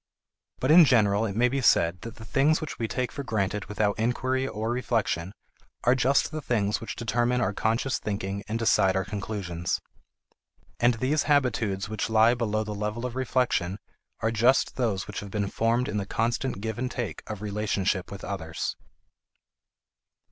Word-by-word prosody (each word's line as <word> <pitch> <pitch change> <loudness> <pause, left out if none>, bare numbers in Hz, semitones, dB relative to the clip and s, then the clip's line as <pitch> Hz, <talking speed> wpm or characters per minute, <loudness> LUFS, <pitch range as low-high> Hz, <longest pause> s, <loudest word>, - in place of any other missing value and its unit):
But 130 - +2
in 170 +2 +10
general 110 -5 +3
it 100 - -5
may 120 +3 +4
be 135 +2 -1
said 85 -7 +3
that 115 +2 -8
the 110 -2 -11
things 145 +6 +3
which 155 - -6
we 115 - -1
take 125 +2 -2
for 140 - -5
granted 105 -5 -1
without 105 +1 -1
inquiry 130 +3 0
or 110 -1 -3
reflection 115 -8 -1 0.5
are 120 - +5
just 130 +3 +2
the 155 0 -4
things 105 -6 0
which 115 - -5
determine 120 +1 0
our 105 - 0
conscious 115 +6 0
thinking 100 -1 -3
and 110 +1 -2
decide 100 -4 +3
our 95 -1 0
conclusions. 95 -4 -3 1.0
And 120 0 +4
these 135 +6 0
habitudes 115 -8 +1
which 110 +1 -3
lie 110 +1 +5
below 110 -3 -1
the 105 0 -5
level 105 +3 -3
of 125 -1 -4
reflection 125 -8 0 0.4
are 110 - +1
just 120 +4 +3
those 110 -7 -1
which 105 - -6
have 100 - -8
been 100 0 -2
formed 115 +2 +1
in 105 - -2
the 100 -1 -3
constant 115 0 -1
give 110 +1 -4
and 130 +1 -1
take 120 -5 -4
of 105 -1 -6
relationship 100 -2 -1
with 100 -1 -8
others. 80 -5 -4
110 Hz, 175 wpm, -27 LUFS, 100-125 Hz, 1.0 s, in